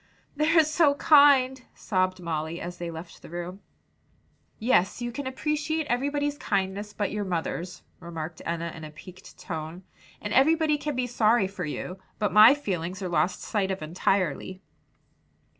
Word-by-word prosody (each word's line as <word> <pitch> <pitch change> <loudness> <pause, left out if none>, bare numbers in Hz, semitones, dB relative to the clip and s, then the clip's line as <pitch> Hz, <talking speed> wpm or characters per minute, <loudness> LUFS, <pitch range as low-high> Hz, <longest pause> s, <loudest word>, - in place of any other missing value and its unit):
"They're 315 +2 +4
so 305 -1 +3
kind," 280 -3 +5
sobbed 185 -2 -1
Molly, 165 -1 -3
as 175 +1 -7
they 175 -1 -4
left 165 +1 -9
the - - -12
room. 175 +3 -6 1.0
"Yes, 215 -4 +2
you 240 0 -3
can 280 +2 -5
appreciate 300 +4 -1
everybody's 285 +3 -1
kindness 200 0 -2
but 205 -2 -2
your 210 0 -2
mother's," 180 0 -4 0.2
remarked 165 -1 -7
Enna 170 0 -3
in 160 - -10
a 155 - -7
piqued 180 +4 -14
tone, 160 +2 -6 0.4
"and 210 - -4
everybody 310 +2 +3
can 295 -1 -3
be 250 0 0
sorry 235 -2 +3
for 190 -3 -5
you, 180 +5 -5 0.2
but 210 -3 -1
my 215 +6 +9
feelings 185 - -4
are 185 - -2
lost 180 +1 0
sight 200 -3 -1
of 190 -4 -3
entirely." 185 +2 -1
195 Hz, 155 wpm, -27 LUFS, 175-265 Hz, 1.0 s, my